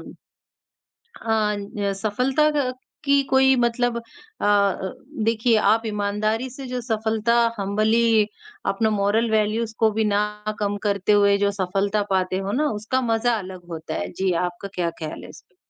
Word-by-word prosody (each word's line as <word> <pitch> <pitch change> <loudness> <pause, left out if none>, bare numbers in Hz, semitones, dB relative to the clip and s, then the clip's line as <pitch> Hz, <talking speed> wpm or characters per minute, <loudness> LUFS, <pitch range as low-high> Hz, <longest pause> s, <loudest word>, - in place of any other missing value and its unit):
अ, - - -15 0.9
ना 210 -2 0
सफलता 250 +9 +1
का 280 -4 0 0.3
की 280 0 +4
कोई 265 0 +5
मतलब 240 0 +1
अ, - - -4 1.2
देखिए 225 +1 +2
आप 220 +2 +3
ईमानदारी 215 +3 -1
से 265 +2 -9
जो 250 0 -3
सफलता 220 0 0 0.2
हम्बली 215 +2 +2 0.5
अपना 220 +2 +1
मोरल 215 +2 +1
वैल्यूज 220 +1 +1
को 220 -1 +4
भी 220 +1 0
ना 205 0 +2 0.4
कम 205 0 -1
करते 200 0 +1
हुए 200 -1 +5
जो 200 0 +1
सफलता 200 +2 0
पाते 185 -1 +1
हो 195 +1 -3
ना, 300 +5 +1
उसका 215 +5 -1
मज़ा 235 0 +1
अलग 185 -2 -9
होता 165 -1 -6
है। 90 +1 -3
जी, 190 - -1
आपका 175 +3 -6
क्या 175 -2 0
ख़्याल 155 -1 -6
है - - -10
इस - - -13
पे? 180 - -36
215 Hz, 155 wpm, -23 LUFS, 200-235 Hz, 1.2 s, कोई